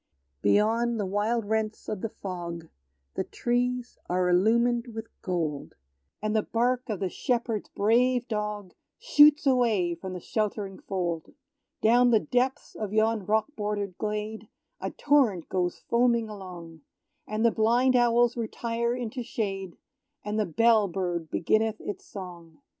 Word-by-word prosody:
Beyond 225 - +2
the 205 - 0
wide 210 +4 0
rents 220 0 -2
of 205 -3 -4
the 225 - -2
fog, 170 -5 -6 0.4
The - - -1
trees 245 0 -2
are 180 0 +1
illumined 235 +6 +3
with 225 0 -6
gold; 160 -6 -3 0.5
And 215 0 0
the 215 - +4
bark 245 +3 0
of 210 -4 -2
the 190 - +1
shepherd's 230 +1 -2
brave 245 +4 +2
dog 210 -4 -3 0.2
Shoots 300 -11 +6
away 230 -10 +2
from 185 +2 -7
the 180 - -5
sheltering 205 -1 -3
fold. 175 -4 -3 0.5
Down 245 +3 +5
the 225 -2 +5
depths 255 +5 -1
of 210 -3 -5
yon 220 -2 +1
rock 220 +8 +1
border'd 205 -3 -3
glade, 215 0 -4 0.3
A - - -3
torrent 255 - +2
goes 180 -2 -1
foaming 235 -1 +1
along; 175 -5 -9 0.5
And 215 +2 -1
the 230 - +5
blind 240 +4 +3
owls 240 0 +4
retire 235 +1 -2
into 245 0 -4
shade, 195 -6 -4 0.5
And 210 +1 -1
the 210 - +1
bell 220 +4 +4
bird 175 -3 -3
beginneth 220 +5 +1
its 205 - -6
song. 175 -5 -10
215 Hz, 140 wpm, -27 LUFS, 190-235 Hz, 0.5 s, Shoots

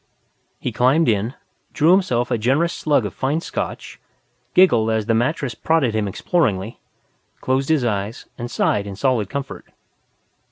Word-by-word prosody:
He - - -3
climbed 135 +7 +3
in, 110 +4 0 0.4
drew 160 +3 +4
himself 125 -11 +2
a - - +2
generous 140 +10 +1
slug 145 -7 +1
of 100 - -5
fine 140 +4 -1
Scotch, - - -5 0.6
giggled 120 -12 +5
as 110 -1 0
the 115 - +1
mattress 125 +2 0
prodded 140 -1 +1
him 110 -2 0
exploringly, 110 - -1 0.6
closed 130 +2 -1
his 155 -6 +2
eyes 105 0 -3
and 120 0 -6
sighed 105 -3 0
in 100 - -6
solid 115 -3 0
comfort. 140 -1 -6
125 Hz, 150 wpm, -21 LUFS, 110-150 Hz, 0.6 s, giggled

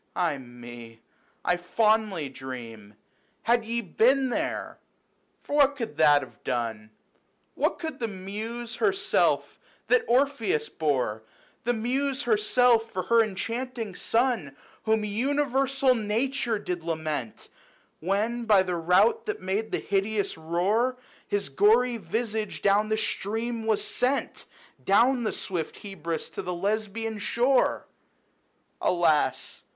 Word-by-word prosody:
Ay 165 -6 0
me! 120 -2 -11 0.5
I 180 - +2
fondly 210 -3 +1
dream 115 -6 -9 0.2
" - - -41
Had 235 +1 +3
ye 235 +1 -2
been 255 +7 +2
there,"... - - -3 0.6
for 290 - -2
what 285 -1 +5
could 230 - -5
that 145 -2 +5
have 130 - -14
done?, 115 -3 -3 0.6
What - - 0
could 320 -2 -5
the 230 - -1
Muse 220 +4 -6
herself 395 -2 +1 0.3
that 460 0 +4
Orpheus 285 - +1
bore, 130 - -1 0.4
The 245 0 +1
Muse 265 +5 -1
herself, 230 +1 +3
for 185 -2 -2
her 230 0 +4
enchanting 225 +1 -4
son, 225 - 0 0.3
Whom 220 -1 +2
universal 270 +3 +1
nature 230 +2 0
did 180 -4 -4
lament, 155 -7 -3
60 - - -14 0.5
When, 215 +7 -1
by 205 -4 +5
the 180 -2 -2
rout 180 - +3
that 420 - -2
made 200 +4 -2
the - - +1
hideous 200 +1 -1
roar, 195 +10 0 0.3
His 205 -7 -1
gory 230 - +4
visage 220 +2 -3
down 205 +2 +3
the 215 - +1
stream 225 +2 -2
was 220 -2 +2
sent, 260 +3 -1 0.4
Down 240 +6 +4
the 220 - 0
swift 175 -5 -3
Hebrus 170 -5 -5
to - - -4
the 180 0 -4
Lesbian 215 +3 -2
shore? 245 +5 +2 0.5
/ - - -43
Alas 155 -7 +1
215 Hz, 130 wpm, -27 LUFS, 175-240 Hz, 0.6 s, what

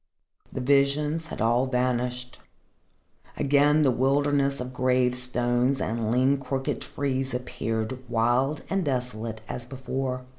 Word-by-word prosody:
The 130 - -4
visions 145 +4 +2
had - - -6
all 120 +4 +2
vanished. 125 0 -1 1.0
Again 145 +2 +4
the 135 - +4
wilderness 140 +2 +1
of 125 +1 -5
gravestones 125 0 +1
and 115 0 -2
lean, 130 +4 +3
crooked 135 0 -3
trees 135 -2 -2
appeared, 115 -1 -3
wild 120 +6 +1
and 195 -1 0
desolate 120 -5 -3
as 125 - -5
before. 130 -1 -4
130 Hz, 115 wpm, -26 LUFS, 125-140 Hz, 1.0 s, Again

